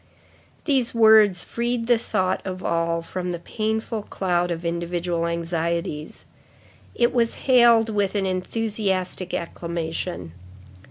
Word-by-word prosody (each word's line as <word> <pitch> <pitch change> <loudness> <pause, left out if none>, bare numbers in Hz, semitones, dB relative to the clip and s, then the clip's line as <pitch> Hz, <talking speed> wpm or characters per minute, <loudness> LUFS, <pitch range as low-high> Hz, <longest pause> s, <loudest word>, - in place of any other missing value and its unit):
These 265 -6 +1
words 220 -5 +6
freed 235 0 -2
the 240 -1 +3
thought 185 -4 -1
of 185 -1 -6
all 165 0 0
from 180 +1 -4
the 175 - -2
painful 220 +4 -3
cloud 175 -3 -1
of 170 0 -4
individual 170 0 -1
anxieties. 170 -2 -3 0.7
It 240 0 +2
was 235 -2 +1
hailed 235 -3 +6
with 205 -2 0
an 200 -1 +1
enthusiastic 190 -1 -2
acclamation. 170 - -4
185 Hz, 115 wpm, -23 LUFS, 170-220 Hz, 0.7 s, words